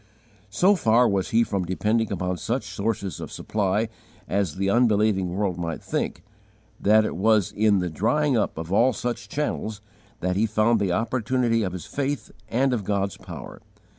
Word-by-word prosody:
So 180 Hz, -, +4 dB
far 120 Hz, -, +4 dB
was 100 Hz, -2 st, 0 dB
he 115 Hz, +1 st, +4 dB
from 100 Hz, -4 st, -2 dB
depending 105 Hz, +5 st, 0 dB
upon 90 Hz, -2 st, -2 dB
any 90 Hz, -, -1 dB
such 120 Hz, +1 st, -1 dB
sources 100 Hz, -1 st, -3 dB
of -, -, -7 dB
supply 105 Hz, +1 st, -1 dB, 0.4 s
as 95 Hz, -5 st, 0 dB
the 95 Hz, +1 st, -1 dB
unbelieving 105 Hz, -4 st, +3 dB
world 90 Hz, -1 st, -1 dB
might 85 Hz, -2 st, -4 dB
think, -, -, -3 dB, 0.6 s
that 110 Hz, +1 st, +4 dB
it -, -, -3 dB
was 105 Hz, 0 st, +3 dB
in 105 Hz, -1 st, +3 dB
the 90 Hz, -1 st, -1 dB
drying 135 Hz, -, +1 dB
up 105 Hz, -7 st, 0 dB
of 80 Hz, +3 st, -4 dB
all 120 Hz, +5 st, +4 dB
such 120 Hz, +3 st, -4 dB
channels 110 Hz, -7 st, -2 dB, 0.4 s
that 90 Hz, +1 st, 0 dB
he 110 Hz, +3 st, +2 dB
found 110 Hz, +2 st, +2 dB
the 100 Hz, -3 st, 0 dB
opportunity 115 Hz, +3 st, +1 dB
of 95 Hz, -4 st, -2 dB
his 90 Hz, -, -6 dB
faith 140 Hz, -4 st, -3 dB, 0.2 s
and 130 Hz, +2 st, +2 dB
of 110 Hz, -4 st, -1 dB
God's 100 Hz, -1 st, -1 dB
power. -, -, -9 dB
105 Hz, 175 wpm, -25 LUFS, 95-115 Hz, 0.6 s, So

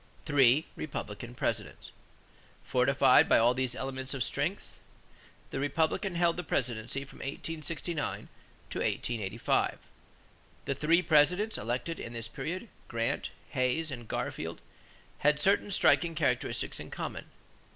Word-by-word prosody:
=Three 145 Hz, -1 st, +5 dB
Republican 120 Hz, -5 st, -6 dB
Presidents.= -, -, -3 dB, 0.7 s
Fortified 130 Hz, +1 st, +5 dB
by -, -, +7 dB
all 120 Hz, +2 st, +5 dB
these 130 Hz, -1 st, -1 dB
elements 130 Hz, 0 st, -3 dB
of 130 Hz, -, +1 dB
strength, -, -, -2 dB, 0.7 s
the -, -, -2 dB
Republicans 160 Hz, +6 st, 0 dB
held 170 Hz, -1 st, +3 dB
the 180 Hz, -, -2 dB
presidency 125 Hz, -1 st, -1 dB
from 135 Hz, -, -14 dB
1869 160 Hz, +2 st, -3 dB, 0.4 s
to -, -, -3 dB
1885. 115 Hz, -2 st, 0 dB, 0.9 s
The 140 Hz, -, 0 dB
three 165 Hz, +5 st, +3 dB
Presidents 180 Hz, +8 st, +4 dB
elected 125 Hz, +9 st, -2 dB
in 115 Hz, -, -6 dB
this 115 Hz, -1 st, -5 dB
period, 160 Hz, -, -5 dB, 0.2 s
Grant, 115 Hz, -1 st, -1 dB, 0.2 s
Hayes, 130 Hz, +5 st, 0 dB
and 120 Hz, -3 st, -7 dB
Garfield, -, -, -3 dB, 0.6 s
had 150 Hz, +1 st, +3 dB
certain 200 Hz, +4 st, +3 dB
striking 170 Hz, -3 st, +3 dB
characteristics 135 Hz, -6 st, 0 dB
in -, -, -8 dB
common. -, -, -5 dB
135 Hz, 120 wpm, -31 LUFS, 125-165 Hz, 0.9 s, by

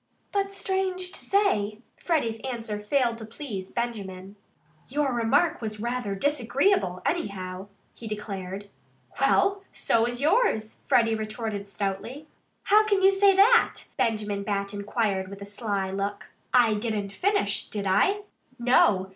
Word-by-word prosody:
But 395 Hz, -1 st, 0 dB
strange 380 Hz, -2 st, -1 dB
to -, -, -4 dB
say, 215 Hz, -, +1 dB, 0.2 s
Freddie's 235 Hz, -10 st, -1 dB
answer 230 Hz, -5 st, -4 dB
failed 235 Hz, +1 st, 0 dB
to -, -, -7 dB
please 220 Hz, -6 st, -6 dB
Benjamin. 200 Hz, -5 st, -5 dB, 0.5 s
"Your 280 Hz, 0 st, 0 dB
remark 285 Hz, +9 st, +2 dB
was 215 Hz, -2 st, -3 dB
very 235 Hz, -2 st, -3 dB
disagreeable, 270 Hz, -, +1 dB
anyhow," 190 Hz, -, -3 dB, 0.3 s
he 230 Hz, -, -9 dB
declared. 200 Hz, -2 st, -5 dB, 0.6 s
"Well 395 Hz, 0 st, +3 dB
so 230 Hz, 0 st, +1 dB
was 240 Hz, 0 st, -3 dB
yours," 295 Hz, -, +1 dB
Freddie 225 Hz, -1 st, +4 dB
retorted 215 Hz, -2 st, -4 dB
stoutly. 200 Hz, +9 st, -4 dB, 0.4 s
"How 425 Hz, +1 st, +5 dB
can 400 Hz, -2 st, +2 dB
you 385 Hz, -, +7 dB
say 390 Hz, 0 st, +5 dB
that?" 460 Hz, +5 st, +5 dB
Benjamin 210 Hz, -3 st, 0 dB
Bat 200 Hz, 0 st, -2 dB
inquired 200 Hz, -1 st, -1 dB
with 200 Hz, +1 st, -9 dB
a -, -, -7 dB
sly 200 Hz, -2 st, -2 dB
look. 200 Hz, +1 st, -4 dB, 0.2 s
"I 240 Hz, -3 st, +5 dB
didn't 210 Hz, -2 st, -2 dB
finish 405 Hz, -, 0 dB
it, -, -, -18 dB
did 205 Hz, -2 st, -3 dB
I?" 385 Hz, -, +3 dB, 0.4 s
"No!" 210 Hz, -6 st, +3 dB
225 Hz, 140 wpm, -26 LUFS, 200-295 Hz, 0.6 s, you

